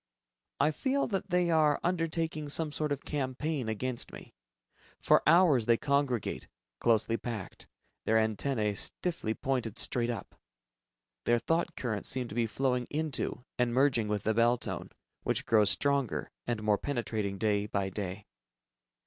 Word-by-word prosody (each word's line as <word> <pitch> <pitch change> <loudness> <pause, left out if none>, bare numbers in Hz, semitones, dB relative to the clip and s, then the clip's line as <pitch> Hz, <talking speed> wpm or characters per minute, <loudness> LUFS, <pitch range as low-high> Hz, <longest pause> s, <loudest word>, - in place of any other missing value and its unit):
I 150 +2 +4
feel 270 - 0
that 195 -2 -2
they 180 -1 +2
are 155 -2 +4
undertaking 165 -3 -1
some 155 +1 0
sort 150 0 -2
of 140 -1 -3
campaign 140 -2 -2
against 120 +3 -3
me. - - -11 0.7
For - - +4
hours 155 -8 +5
they 115 -1 +5
congregate, 140 -4 0 0.3
closely 115 0 +2
packed, 115 -6 -6 0.4
their 110 - +3
antennae 110 0 0
stiffly 110 - -1
pointed 125 -5 -2
straight 120 0 +1
up. 120 - -5 0.9
Their 120 - +4
thought 165 +7 0
currents 110 -5 -1
seem 130 -2 0
to - - -7
be 115 0 +1
flowing 125 +1 0
into 150 -4 -2
and 120 -1 +1
merging 130 -5 +3
with 105 -1 -1
the 110 - +1
bell 120 +2 +4
tone, - - -5 0.3
which - - -1
grows 105 -3 +4
stronger 140 -4 +1 0.2
and 115 -3 -2
more 105 -1 +2
penetrating 110 -7 -2
day 105 -1 +1
by 100 -2 -1
day. 95 0 -5
125 Hz, 150 wpm, -31 LUFS, 110-150 Hz, 0.9 s, hours